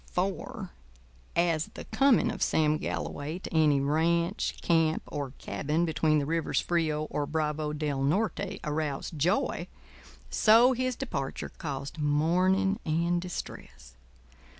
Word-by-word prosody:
For, 190 +1 -3 0.6
as 170 -1 +2
the - - -7
coming 255 -4 +3
of - - -7
Sam 155 -1 +2
Galloway 150 +4 -4
to 185 - -8
any 155 -3 +4
ranch, 170 +6 +1
camp, 165 -2 +2
or 145 -2 -4
cabin 155 +4 -1
between 155 -1 +2
the 145 - 0
rivers 165 +1 0
Frio 160 -3 0
or 145 -1 -1
Bravo 155 0 -1
del 150 -2 -2
Norte 180 +8 0
aroused 150 0 -3
joy, 190 - +1 0.6
so 230 +4 +6
his 255 0 -1
departure 140 - -4
caused 140 +1 -6
mourning 180 +7 +2
and 170 +2 +1
distress. 175 - -8
160 Hz, 125 wpm, -29 LUFS, 150-180 Hz, 0.6 s, so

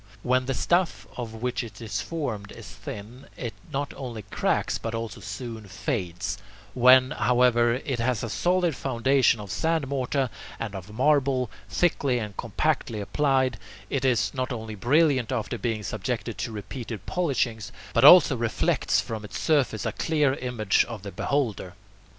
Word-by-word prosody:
When 130 0 +2
the 135 - 0
stuff 175 +4 +1
of 115 -2 -6
which 125 0 -1
it 110 -4 -10
is 110 -2 -3
formed 125 -12 -4
is - - -10
thin, 110 +6 -9
it 120 -4 -4 0.2
not 140 +1 -2
only 120 -5 -6
cracks 100 - 0
but 115 0 -4
also 115 -1 -5
soon 110 0 -6
fades; 95 -2 -3 0.3
when, 130 +1 +6
however, 120 -3 +3
it 130 -1 -3
has 120 -1 0
a - - -2
solid 175 - +1
foundation 130 -1 +2
of 100 -3 -7
sand 160 -3 0
mortar 135 -1 -1 0.3
and 110 -3 -4
of 95 +1 -8
marble, 130 0 +2 0.2
thickly 140 -7 +1
and 105 -4 -4
compactly 120 0 -1
applied, 130 0 +1 0.3
it 135 -2 0
is 125 -5 +2
not 130 0 -2
only 110 -2 -5
brilliant 135 +3 +2
after 115 -5 -2
being 115 -3 -2
subjected 85 - -3
to - - -3
repeated 110 0 -6
polishings, 130 - -1 0.2
but - - +3
also - - +9
reflects - - +1
from 110 -2 -4
its 105 - -6
surface 140 -9 +1
a - - 0
clear 150 -4 +1
image 125 -6 +1
of 115 -5 -8
the 100 - -6
beholder. 110 -11 -2
125 Hz, 155 wpm, -26 LUFS, 110-135 Hz, 0.3 s, also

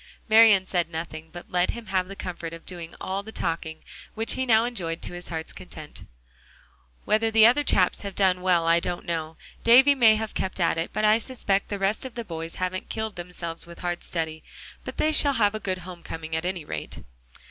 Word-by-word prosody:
Marian 215 -4 +7
said 175 -3 -1
nothing, 160 -1 -6
but 175 - -10
let 180 0 +2
him 235 -1 -5
have 185 -2 0
the 195 - -8
comfort 170 -3 -6
of 165 - -10
doing 170 -2 -7
all 190 +1 -3
the 220 +2 -10
talking, 165 -4 -3 0.3
which 225 +1 +2
he 260 0 -2
now 225 -1 +5
enjoyed 175 -9 -3
to - - -6
his 175 0 -7
heart's 160 -1 -5
content. 155 -4 -9 1.0
"Whether 220 +1 +2
the 220 0 +6
other 250 +6 +5
chaps 185 -9 +2
have 200 -2 -6
done 185 -2 +2
well, 180 -2 +2
I 165 +1 +4
don't 175 0 -4
know. 160 -1 -3 0.3
Davie 260 +5 +7
may 230 -5 +6
have 220 0 -3
kept 190 - -3
at 165 -2 +2
it, 165 - -2
but 215 +1 0
I 215 +1 +5
suspect 210 -5 -1
the 205 - -2
rest 195 +5 0
of 260 -2 -7
the 235 -2 -5
boys 165 -2 -6
haven't 185 0 -3
killed 220 -1 -3
themselves 175 -2 -6
with 170 - -12
hard 175 -1 -2
study. 160 -2 -3 0.4
But - - -7
they 310 - +2
shall 290 -2 +5
have 210 -4 +2
a 215 - -3
good 190 -3 -2
home 180 -2 -9
coming, 160 -1 -6
at 160 +1 -2
any 180 -4 -3
rate." - - -6
185 Hz, 215 wpm, -26 LUFS, 170-220 Hz, 1.0 s, Marian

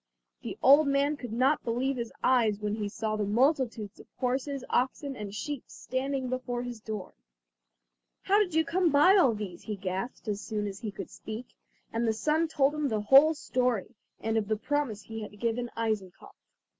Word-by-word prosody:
The - - -6
old 285 +3 +7
man 280 +2 +2
could 245 -5 -8
not 260 +6 +2
believe 250 +3 -1
his 235 -1 -4
eyes 230 -5 +3
when 210 -1 -2
he 210 -1 -2
saw 215 +1 -2
the 210 - -1
multitudes 235 -1 +1
of - - -14
horses, 260 +2 -1
oxen 270 +2 0
and 210 -4 -6
sheep 275 +6 -5
standing 265 0 -3
before 245 -1 -3
his 245 -2 -6
door. 210 -4 -6 1.1
"How 400 +2 +4
did 365 -6 0
you 320 0 +3
come 355 +1 +2
by 300 +7 +6
all 265 - +5
these?" 195 -5 -6
he 210 - -4
gasped, 190 +5 -4
as 205 -1 -2
soon 210 -2 -3
as 200 -1 -5
he 215 - -4
could 205 - -8
speak; 220 +3 -8 0.4
and 230 +1 0
the 220 - +2
son 310 +8 +1
told 290 -2 +2
him 300 -1 -1
the 215 -2 0
whole 275 +9 +7
story, 250 -6 -1 0.3
and 225 0 -1
of 215 -2 0
the 215 0 0
promise 260 -4 -2
he 225 0 -7
had 210 -1 -9
given 235 +1 -1
Eisenkopf. 215 -5 -3
245 Hz, 190 wpm, -29 LUFS, 215-275 Hz, 1.1 s, old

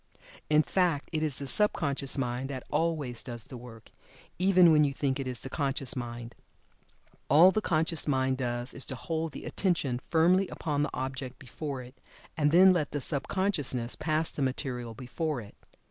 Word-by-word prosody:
In 155 0 +5
fact, 175 -6 0
it 155 -2 -1
is 150 -4 +2
the 140 - -1
sub 210 +9 +4
conscious 140 -2 -2
mind 125 0 -2
that 130 -2 -5
always 150 -6 0
does 120 -3 -3
the 135 -1 -10
work, 115 -2 -12 0.5
even 185 -2 +6
when 150 -1 +5
you 140 -2 +1
think 140 -1 -1
it 135 - -3
is 125 -2 -4
the - - -6
conscious 135 -2 -1
mind. 120 -1 -6 1.0
All 165 +7 +7
the 215 - 0
conscious 160 -3 +1
mind 130 -2 +1
does 120 0 -1
is 140 - -3
to 130 - -3
hold 160 +4 -3
the - - -9
attention 155 -10 -1
firmly 180 +4 +3
upon 145 -4 -2
the 150 - 0
object 130 0 -5
before 140 -1 -6
it, 125 +1 -13 0.4
and 150 -2 +2
then 185 +4 +7
let 155 -6 -1
the 145 - -1
sub 140 +1 0
consciousness 145 -11 -1
pass 155 +1 0
the - - -5
material 125 -3 -3
before 135 +4 -3
it. 105 -3 -11
140 Hz, 185 wpm, -29 LUFS, 130-160 Hz, 1.0 s, All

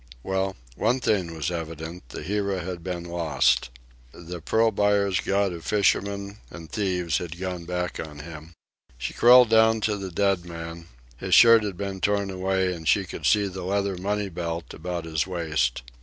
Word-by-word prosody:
Well, 95 0 -1 0.2
one 125 - +1
thing 95 -9 0
was 80 +1 -2
evident: 80 -2 -6
The - - -7
Hira 100 -1 -1
had 90 -1 -6
been 90 -1 -4
lost. 85 -5 +1 0.4
The 85 +2 -9
pearl 110 +7 +2
buyer's 100 -2 +2
god 100 -1 0
of 85 -1 -8
fishermen 100 0 0
and 80 -3 -11
thieves 90 -4 0
had 85 -1 -7
gone 90 -2 -4
back 90 0 -3
on 75 -2 -7
him. 80 +1 -10 0.4
She - - -4
crawled 125 0 +7
down 110 0 +5
to 105 -1 0
the 95 -1 -5
dead 95 0 +1
man. 85 -1 -8 0.3
His - - +2
shirt 115 -1 +8
had 100 -4 -4
been 95 -1 -4
torn 100 0 +1
away, 95 0 0
and 80 -2 -8
she 100 - +3
could 80 -4 -4
see 100 +9 +4
the 95 -1 -5
leather 100 +1 -1
money 100 +2 -2
belt 85 -1 -5
about 85 +1 -5
his 80 0 -1
waist. 75 -9 -1
90 Hz, 175 wpm, -25 LUFS, 85-100 Hz, 0.4 s, shirt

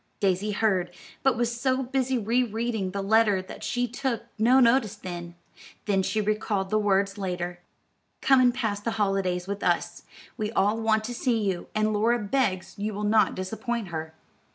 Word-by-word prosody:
Daisy 195 +1 +1
heard, 195 -4 +1 0.3
but 265 -3 +2
was 235 0 0
so 260 0 +1
busy 260 0 0
re 230 +3 +1
reading 225 -4 -2
the 195 +1 -4
letter 215 -1 +4
that 185 - -9
she 245 0 0
took 250 0 -2 0.2
no 245 +4 +5
notice 235 -4 +3
then, 175 -3 -7 0.5
though 200 -2 +2
she 195 +3 -1
recalled 210 -2 -1
the 215 - +3
words 200 0 +1
later. 180 -2 -3 0.6
"Come 265 -1 +5
and 250 -1 +5
pass 220 -5 -2
the 225 +2 -3
holidays 195 -3 0
with 200 +1 -4
us. 175 -1 0 0.4
We 215 -2 -2
all 210 +2 +2
want 220 -1 +2
to 245 +3 -4
see 240 -1 0
you, 190 -3 -2
and 215 0 +1
Laura 225 +3 +2
begs 205 -4 -1
you 210 0 -2
will 210 - -4
not 215 +1 +3
disappoint 220 +2 -3
her." 160 -1 -5
215 Hz, 175 wpm, -26 LUFS, 195-235 Hz, 0.6 s, no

